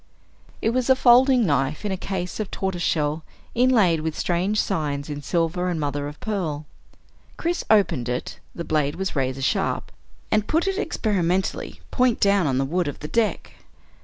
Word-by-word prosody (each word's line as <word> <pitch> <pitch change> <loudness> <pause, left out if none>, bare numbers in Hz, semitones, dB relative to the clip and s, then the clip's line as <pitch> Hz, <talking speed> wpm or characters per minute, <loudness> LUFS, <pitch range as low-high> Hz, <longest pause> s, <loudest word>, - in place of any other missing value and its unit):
It 225 - +2
was 255 +1 0
a 260 - +7
folding 255 -1 +5
knife 145 +2 0
in 205 - -1
a - - 0
case 185 0 -4
of 215 - -3
tortoise 190 -2 -3
shell 155 -1 0 0.3
inlaid 225 -9 +4
with 160 0 -3
strange 185 +5 0
signs 150 -5 -1
in 145 0 -5
silver 175 +3 0
and 170 -3 -2
mother 145 -1 -2
of 150 0 -9
pearl. 165 -9 -3 0.7
Chris 345 +1 -1
opened 190 - +3
it 125 0 -4 0.2
the 170 - -4
blade 150 -1 0
was 190 0 -3
razor 135 -1 -1
sharp - - 0 0.4
and 215 -1 +2
put 325 +3 +1
it 390 +1 0
experimentally 190 - -1
point 250 -3 +2
down 200 -4 +3
on 130 -2 +1
the 135 - +1
wood 175 +4 0
of 145 - -4
the 150 - -4
deck. 225 +4 -1
180 Hz, 175 wpm, -24 LUFS, 150-215 Hz, 0.7 s, a